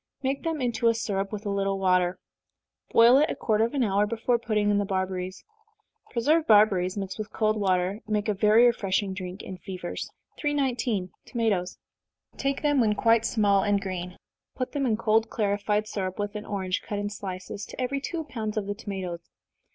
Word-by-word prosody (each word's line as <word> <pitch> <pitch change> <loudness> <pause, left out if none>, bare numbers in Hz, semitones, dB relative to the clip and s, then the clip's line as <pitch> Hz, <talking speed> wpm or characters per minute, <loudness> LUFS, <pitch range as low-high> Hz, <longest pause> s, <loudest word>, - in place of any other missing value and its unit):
Make 270 +1 -1
them 325 -3 -2
into 235 -2 +1
a 230 - +4
syrup 200 -3 -2
with 210 0 -6
a 200 - -1
little 195 0 0
water 180 -1 +2 0.7
boil 235 +4 +7
it 305 - +3
a - - -2
quarter 220 0 +2
of 235 - -4
an 270 - +2
hour 205 -1 +2
before 230 +2 0
putting 210 -3 +1
in 205 - +2
the - - +1
barberries. 185 -1 -3 0.6
Preserved 305 +7 +2
barberries, 205 -3 +4
mixed 195 0 -4
with 215 0 -5
cold 215 -1 +1
water, 190 -1 +1
make 210 0 0
a 210 - +2
very 215 +4 +5
refreshing 200 -4 +1
drink 185 0 -6
in 185 -1 -8
fevers. 180 0 -6 0.3
319. 250 -9 0 0.2
Tomatoes. 205 -7 -1 0.6
Take 275 +1 -2
them 290 -3 +3
when 210 -2 +2
quite 230 +1 +3
small 200 -3 +3
and 205 0 +2
green 180 -2 -5 0.4
put 255 - -3
them 280 -3 0
in 220 -3 +1
cold 220 0 +2
clarified 205 0 0
syrup, 190 -3 -4
with 205 0 -3
an 210 0 -6
orange, 190 -2 -2
cut 210 - -5
in 205 0 -3
slices, 195 0 -6
to - - -10
every 265 +2 -1
two 325 +3 -3
pounds 220 -7 -4
of 210 - 0
the 205 - -2
tomatoes. 190 -5 -6
210 Hz, 190 wpm, -27 LUFS, 195-230 Hz, 0.7 s, boil